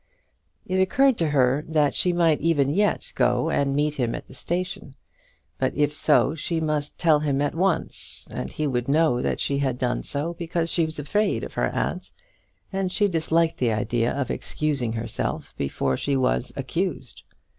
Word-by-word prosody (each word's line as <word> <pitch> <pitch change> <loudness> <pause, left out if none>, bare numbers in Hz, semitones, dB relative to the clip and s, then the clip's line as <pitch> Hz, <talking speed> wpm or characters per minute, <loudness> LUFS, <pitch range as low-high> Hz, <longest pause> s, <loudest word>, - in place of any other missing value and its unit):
It 185 - -1
occurred 265 +8 +4
to 165 -2 +1
her 135 0 +2
that 150 -3 +2
she 180 - +1
might 170 -3 +2
even 145 -4 +2
yet 205 +6 +1
go 125 +5 +2
and 140 -2 +1
meet 150 +1 +1
him 120 -3 0
at - - -7
the - - -13
station. 175 0 -4 0.6
But 130 - 0
if 145 0 +1
so, - - +3
she 165 +1 -2
must 150 -2 -2
tell 160 -3 +4
him 145 -2 0
at 145 0 0
once, 180 0 -1
and 65 - -4
he 155 - -2
would 125 -3 -1
know 145 -3 +3
that - - -1
she 140 0 0
had 130 -3 0
done 125 -1 -1
so 150 +4 -3
because 170 -1 -2
she 165 - +2
was 160 - -6
afraid 205 +9 0
of - - -6
her - - +1
aunt, - - -3 0.6
and 190 -1 -1
she 205 +2 +2
disliked 165 -2 +1
the 120 -3 +2
idea 115 +2 0
of 140 -2 -2
excusing 140 -7 -1
herself 115 0 -3
before 70 -1 -1
she 140 - 0
was 65 - +1
accused. - - -3
150 Hz, 180 wpm, -24 LUFS, 130-165 Hz, 0.6 s, occurred